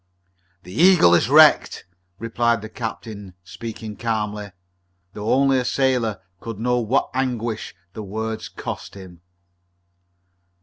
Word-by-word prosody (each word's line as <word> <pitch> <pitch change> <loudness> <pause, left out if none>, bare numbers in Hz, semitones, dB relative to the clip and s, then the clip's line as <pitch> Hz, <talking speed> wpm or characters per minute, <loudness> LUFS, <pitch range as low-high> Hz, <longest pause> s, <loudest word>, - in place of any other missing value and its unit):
"The 90 - -11
Eagle 170 - +6
is 95 +7 +3
wrecked," 155 +1 +5 0.3
replied 115 0 0
the 110 - -7
captain, 110 -5 -7
speaking 105 +4 -8
calmly, 105 -3 -3 0.6
though 105 +1 -3
only 135 0 +4
a - - -1
sailor 125 -5 0 0.2
could 115 +1 -7
know 125 +3 +1
what 120 +4 0
anguish 120 -6 -2 0.2
the 110 - -6
words 110 +2 -4
cost - - -7
him. 90 -3 -12
110 Hz, 120 wpm, -22 LUFS, 105-125 Hz, 0.6 s, Eagle